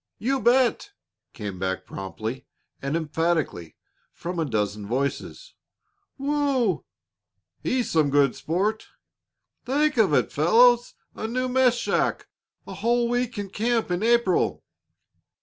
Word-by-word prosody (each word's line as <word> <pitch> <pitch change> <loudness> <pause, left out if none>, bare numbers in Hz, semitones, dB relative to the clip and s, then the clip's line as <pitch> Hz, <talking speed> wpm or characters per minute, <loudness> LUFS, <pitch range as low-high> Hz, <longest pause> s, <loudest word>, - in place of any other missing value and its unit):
"You 265 +4 -1
bet!" 255 - +2 0.4
came 100 -4 -6
back 95 0 -2
promptly 110 +7 -6 0.3
and 140 +4 -1
emphatically 160 - -1 0.4
from 175 0 -5
a 160 - +1
dozen 105 -4 -2
voices. 140 - -3 0.6
"Wough! 275 - +1 0.8
He's 250 -2 -1
some 155 -3 +3
good 140 -2 +3
sport!" 200 +7 -1 0.8
"Think 290 +3 +1
of 215 -7 +4
it, - - +1
fellows! 240 +10 +4 0.2
A 220 - -5
new 255 +3 -1
mess 255 -1 +3
shack! 240 - -1 0.4
A - - -8
whole 235 +4 +1
week 245 -1 -1
in 200 -2 -5
camp 225 -2 0
in 175 +1 -1
April!" 235 -5 +2
205 Hz, 120 wpm, -25 LUFS, -, 0.8 s, of